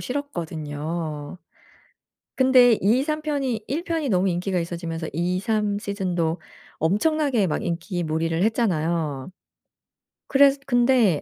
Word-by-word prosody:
싫었거든요. 160 - -4 1.0
근데 255 -3 +6
2-3 270 +9 +1
편이 275 -7 -2
1 305 +6 -2
편이 320 -4 -1
너무 190 -2 +2
인기가 180 +1 -1
있어지면서 170 -1 -4
2-3 200 +5 0
season도 180 -5 -2 0.4
엄청나게 240 - +1
막 155 - -2
인기 175 +1 -3
몰이를 165 +2 -1
했잖아요. 170 - 0 1.0
그래서 275 0 +5
근데 240 - +3
190 Hz, 250 characters per minute, -24 LUFS, 165-250 Hz, 1.0 s, 근데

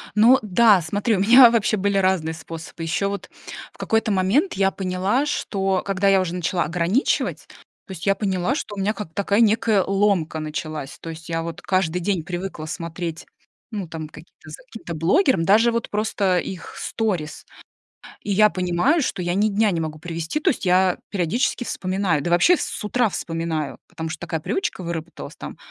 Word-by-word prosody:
Ну 235 +5 +6
да, 210 -1 +4
смотри, 205 +7 0
у - - -2
меня 240 +5 +8
вообще 220 -2 +1
были 200 0 0
разные 185 -4 +1
способы. 165 +1 -8
Еще 165 +5 0
вот 200 0 -5 0.4
в - - -22
какой-то 225 -1 0
момент 200 - +2
я 195 0 +2
поняла, 190 +8 0
что 195 -9 -1
когда 195 0 0
я 195 -1 +5
уже 180 -1 -3
начала 175 0 0
ограничивать, 175 - 0 0.4
то - - -10
есть 180 -3 -7
я 195 -1 +3
поняла, 195 +4 -1
что 210 -9 -5
у - - -6
меня 200 +2 0
как 205 -7 -8
такая 200 +3 +1
некая 220 -3 +3
ломка 195 -5 +1
началась. 155 -2 -5
То 165 - -8
есть 160 +1 -9
я 165 0 -1
вот 165 -1 -6
каждый 180 -2 0
день 180 -2 -1
привыкла 175 -2 -5
смотреть, 165 0 -5 0.5
ну, 200 -5 -4
там 160 -1 -6
каким-то 160 -1 -15
за 155 - -8
каким-то 225 -9 -8
блогером, 190 - +2
даже 225 +4 +5
вот 235 0 -2
просто 205 -3 0
их 180 0 -7
сторис. 185 -9 -3 0.8
И 205 - -4
я 210 +2 +5
понимаю, 180 - +1
что 190 - -2
я 175 0 -1
ни 210 +3 +2
дня 210 0 +2
не 170 - -1
могу 155 -1 -4
провести, 165 - -4
то - - +2
есть 245 - -2
я 185 0 +3
периодически 200 +7 0
вспоминаю, 185 -7 -1
да 175 - -2
вообще 175 - +5
с - - -4
утра 235 +1 +1
вспоминаю, 165 -5 -3
потому 160 0 -6
что - - -6
такая 165 -1 -3
привычка 190 - -3
выработалась: 170 -1 -6
там, - - -9
185 Hz, 185 wpm, -22 LUFS, 165-210 Hz, 0.8 s, меня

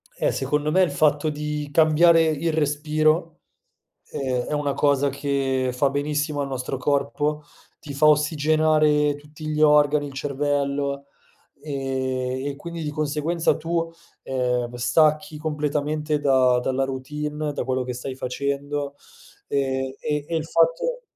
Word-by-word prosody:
Eh, - - +1
secondo 150 +3 -1
me 185 +4 +4
il 180 - 0
fatto 150 -1 +2
di 150 0 -4
cambiare 165 +2 +5
il 160 +1 0
respiro, 155 +2 +1 0.7
ehm, 130 -3 -1
è - - -3
una 145 -1 0
cosa 140 0 +2
che 135 -2 -1
fa 135 +3 +2
benissimo 145 +1 -1
al 140 - -2
nostro 130 0 -4
corpo, 145 +2 -1 0.4
ti 145 - -8
fa 140 +2 +3
ossigenare 150 0 +3
tutti 150 +2 -10
gli 155 0 -1
organi, 150 -1 +4
il 140 - -10
cervello, 140 0 -2 0.5
ehm, 130 -2 -3
e 145 - -2
quindi 170 +2 -6
di 150 - -3
conseguenza 155 +3 0
tu, 165 +1 -2 0.3
ehm, 125 -2 -1
stacchi 155 +7 +2
completamente 150 0 -1
da 130 -3 +3
dalla 130 +2 -1
routine, 150 +3 -4
da - - -2
quello 130 0 -1
che 125 0 -4
stai 130 +2 -6
facendo. 140 +2 -3 0.5
Ehm, 130 -1 -1
e 150 -1 -2
e 170 - -2
il 160 -1 -1
fatto 165 - +1
145 Hz, 140 wpm, -23 LUFS, 135-155 Hz, 0.7 s, cambiare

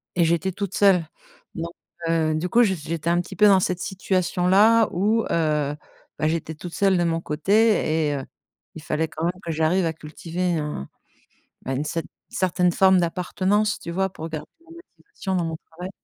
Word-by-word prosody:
Et 170 - +3
j'étais 170 +3 +1
toute 195 0 -5
seule. 190 -5 +4 0.5
Donc 170 0 -4 0.4
heu, 160 -1 +1
du 165 +4 -2
coup 240 +4 +5
je 200 -4 +2
j'étais 165 -1 -3
un 175 0 +3
petit 175 - -10
peu 210 - +6
dans 195 -2 +6
cette 180 -1 -1
situation-là 190 +3 +3
où, 215 +5 +1
heu, 150 -3 0 0.4
bah 155 - +1
j'étais 160 0 -2
toute 175 +2 -9
seule, 195 -2 +2
de 175 - +2
mon 165 -1 0
côté 160 -1 +2
et 145 - -1
heu, 135 -1 -5 0.5
il 160 - -8
fallait 155 +1 -1
quand 160 +1 -4
même 180 +1 -2
que 170 - -3
j'arrive 160 +4 +1
à 165 - -1
cultiver 170 +3 -3
un 150 - -4 0.7
bah 135 - -4
une 140 +3 -2
cette 165 +2 -3 0.2
certaine 180 -1 +1
forme 190 +1 +5
d'appartenance, 185 +4 0
tu - - -7
vois, 190 +2 0
pour 160 -3 -7
garder 155 -2 -6
la 335 0 -22
motivation 210 - -6
dans 175 - 0
mon 165 -1 -3
travail. 180 +3 -7
175 Hz, 190 wpm, -23 LUFS, 160-190 Hz, 0.7 s, peu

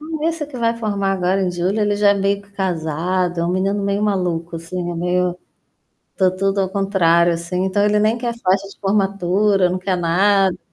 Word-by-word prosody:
Hum, 315 +1 -5
esse 325 -3 -3
que 280 -3 -10
vai 230 0 0
formar 200 -3 -1
agora 190 +1 0
em 180 - 0
julho, 180 +4 -1
ele 205 -1 +1
já 205 -1 +4
é - - +3
meio 200 +1 0
que 200 - -24
casado. 175 -1 -2
É - - 0
um 170 - -1
menino 195 +2 0
meio 200 +1 -1
maluco, 175 -5 -1
assim, 175 +2 -5
meio 180 +1 -1 0.8
tá 190 -2 +3
tudo 195 +1 -1
ao 190 - -1
contrário, 175 -4 +2
assim. 170 +2 -3
Então 195 +2 +1
ele 210 0 +2
nem 215 +3 +2
quer 235 0 -3
festa 195 -3 0
de - - -15
formatura, 195 -1 +1
não 180 - -1
quer 185 0 -1
nada. 190 +2 +2
195 Hz, 200 wpm, -19 LUFS, 180-205 Hz, 0.8 s, já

